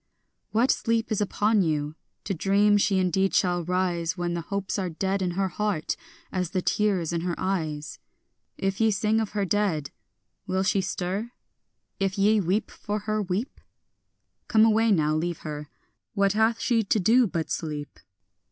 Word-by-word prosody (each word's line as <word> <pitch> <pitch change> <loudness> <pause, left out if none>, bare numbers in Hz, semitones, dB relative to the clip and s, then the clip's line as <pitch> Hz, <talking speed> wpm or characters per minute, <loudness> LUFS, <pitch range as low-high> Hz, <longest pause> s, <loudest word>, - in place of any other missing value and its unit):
What 235 +4 +3
sleep 230 0 0
is 215 - +1
upon 210 +1 +2
you, 150 -3 0 0.3
to 200 - -2
dream 200 +4 +3
she 200 -1 +2
indeed 190 +1 +1
shall 175 -1 +2
rise, 180 0 -1
When 175 -1 -1
the 170 - -2
hopes 200 +3 -3
are 185 -2 -1
dead 190 +4 -1
in 180 -1 0
her 195 -1 +1
heart 205 -5 -1 0.4
as 180 -3 -1
the 185 -1 -1
tears 190 -6 +1
in 170 - -1
her 175 0 -2
eyes? 155 -6 -3 0.6
If 195 +2 -1
ye 225 - +5
sing 215 +1 +1
of 220 -2 -3
her 205 -2 0
dead, 185 -8 0 0.6
will 190 +1 0
she 195 0 +2
stir? 195 +6 -3 0.7
if 195 0 0
ye 210 +2 +4
weep 195 +3 0
for 210 0 -4
her, 215 +1 -1
weep? 195 +6 -3 0.9
Come 220 -1 +5
away 225 0 +3
now, 155 -5 +3
leave 170 +1 -2
her; 150 -1 -6 0.5
what 200 -1 +3
hath 220 +2 +2
she 235 -3 +2
to 215 +1 +1
do 230 +6 +4
but 165 -4 -3
sleep? 150 -3 -4
195 Hz, 170 wpm, -26 LUFS, 175-210 Hz, 0.9 s, ye